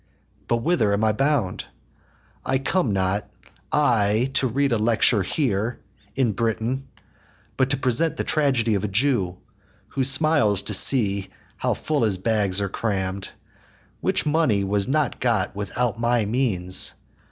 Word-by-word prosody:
But 115 -1 0
whither 120 -12 +2
am 100 +2 0
I 110 - +3
bound? 135 -6 0 0.8
I 130 - 0
come 135 - 0
not, 95 +1 -1 0.4
I, 115 -3 +2
To 135 -1 +2
read 140 +3 0
a 115 - +1
lecture 110 -1 +2
here 115 - -1 0.4
in 130 -4 +1
Britain, 115 +5 -2 0.7
But 130 0 +1
to 135 - 0
present 130 +5 0
the - - -1
tragedy 130 -7 +1
of 100 -1 -1
a - - 0
Jew, 100 -4 0 0.5
Who 135 - -1
smiles 135 - +3
to - - -3
see 100 -7 +3 0.3
how - - -1
full 155 -2 -2
his 105 -5 +2
bags 100 -1 +1
are 100 - -1
cramm'd; 95 -2 -3 0.7
Which - - 0
money 150 -10 +1
was 100 0 0
not 145 0 0
got 115 -7 0
without 105 +2 -2
my 120 -1 +1
means. 100 -6 +1
115 Hz, 145 wpm, -23 LUFS, 100-135 Hz, 0.8 s, I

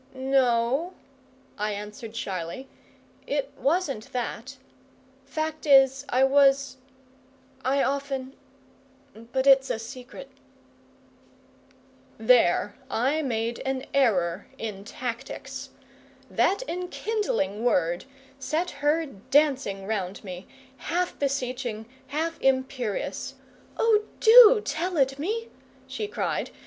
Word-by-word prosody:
"No," 260 +4 +1 0.6
I 210 0 -1
answered 210 +2 -8
shyly, 190 +4 -4 0.6
"it 280 -1 -1
wasn't 280 -7 -1
that. 250 +2 -4 0.7
Fact 310 +2 -4
is, 270 -1 +5
I 255 +2 +3
was 275 0 +4 0.9
I 270 +2 +2
often 275 -1 -2 0.8
but 240 +4 -3
it's 270 -1 +6
a - - 0
secret." 250 +3 -10 1.9
There 220 -4 +4 0.2
I 275 +7 +1
made 235 -4 -2
an 265 0 -3
error 195 -9 +2
in 205 -3 -6
tactics. 235 0 -6 0.6
That 400 +6 +2
enkindling 360 - -2
word 175 -6 +1 0.3
set 320 +6 -1
her 305 +3 +2
dancing 265 -4 0
round 200 -2 -3
me, 185 -1 -8 0.3
half 350 +8 -2
beseeching, 255 -5 -2 0.2
half 320 +4 -3
imperious. 260 -4 -1 0.4
"Oh, 440 -2 +4 0.2
do 455 -1 +9
tell 350 +2 -2
it 270 0 +2
me!" 445 +9 -2 0.4
she 425 - -4
cried. - - -2
265 Hz, 95 wpm, -26 LUFS, 225-295 Hz, 1.9 s, do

